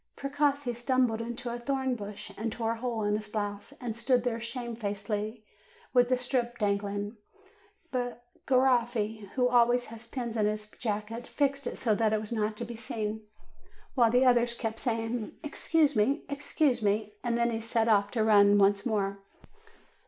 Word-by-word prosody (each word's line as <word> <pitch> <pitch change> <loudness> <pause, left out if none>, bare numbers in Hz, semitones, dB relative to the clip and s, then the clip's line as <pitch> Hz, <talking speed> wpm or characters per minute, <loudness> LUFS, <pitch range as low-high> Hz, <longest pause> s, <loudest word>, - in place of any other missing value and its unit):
Precossi 280 -2 0
tumbled 240 -1 +1
into 240 +1 -4
a 240 - -4
thorn 265 +1 0
bush, 205 -3 -7
and 225 +1 -3
tore 225 0 -1
a 230 - -3
hole 230 -2 -2
in 205 0 +2
his 215 0 -4
blouse, 205 -1 -4
and 235 -4 -4
stood 245 +1 +2
there 235 -2 -1
shamefacedly, 220 -2 -3 0.5
with 245 -1 +5
the 255 - +3
strip 245 -1 -1
dangling; 205 0 -1 0.7
but 245 -1 -3 0.2
Ga 265 - +3
roffi, 235 -5 +2
who 250 -1 +3
always 245 0 +4
has 230 +1 -8
pins 235 -2 -4
in 215 -2 +2
his 210 0 -2
jacket, 220 +1 -3
fixed 280 -2 0
it - - -4
so 225 -4 +2
that 220 0 +2
it 215 - +2
was 215 +1 -7
not 215 -1 -1
to 235 - -4
be 235 0 -7
seen, 220 -1 -4 0.7
while 240 -4 +4
the 250 +3 +4
other 240 -1 +5
kept 225 -2 -3
saying, 225 -1 -2
''Ex 295 0 -7
cuse 305 -4 +4
me, 215 +7 +2
excuse 280 -2 +1
me," 210 0 0
and 235 -1 0
then 235 0 +2
he 225 0 -2
set 225 0 +1
out 205 -2 +3
to 225 -3 +2
run 205 -2 +6
once 200 0 +4
more. 200 -3 -1
230 Hz, 180 wpm, -29 LUFS, 215-245 Hz, 0.7 s, run